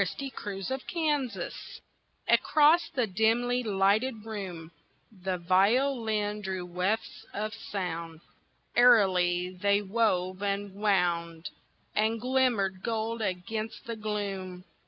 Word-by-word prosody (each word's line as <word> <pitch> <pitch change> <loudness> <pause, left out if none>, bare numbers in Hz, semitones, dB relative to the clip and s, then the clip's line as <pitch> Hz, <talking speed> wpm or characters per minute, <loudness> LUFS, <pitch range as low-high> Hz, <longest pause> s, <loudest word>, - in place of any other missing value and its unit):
A - - +6
Minuet 205 -2 -5
of 265 0 -2
Mozart's 285 - -2 0.5
Across 310 +3 +4
the 250 -3 +2
dimly 225 +5 +1
lighted 215 +2 +1
room 185 -7 -6 0.4
The 190 -2 -3
violin 210 +3 +1
drew 190 -2 -4
wefts 180 +5 -2
of 215 +1 -3
sound, 170 -7 -5 0.5
Airily 185 -7 +4
they 200 0 +3
wove 190 -3 0
and 200 -1 -2
wound 175 -5 0 0.4
And 220 +2 +1
glimmered 240 -7 +1
gold 225 +1 -2
against 215 +3 -3
the 230 - -4
gloom. 200 -4 -4
205 Hz, 105 wpm, -29 LUFS, 185-230 Hz, 0.5 s, A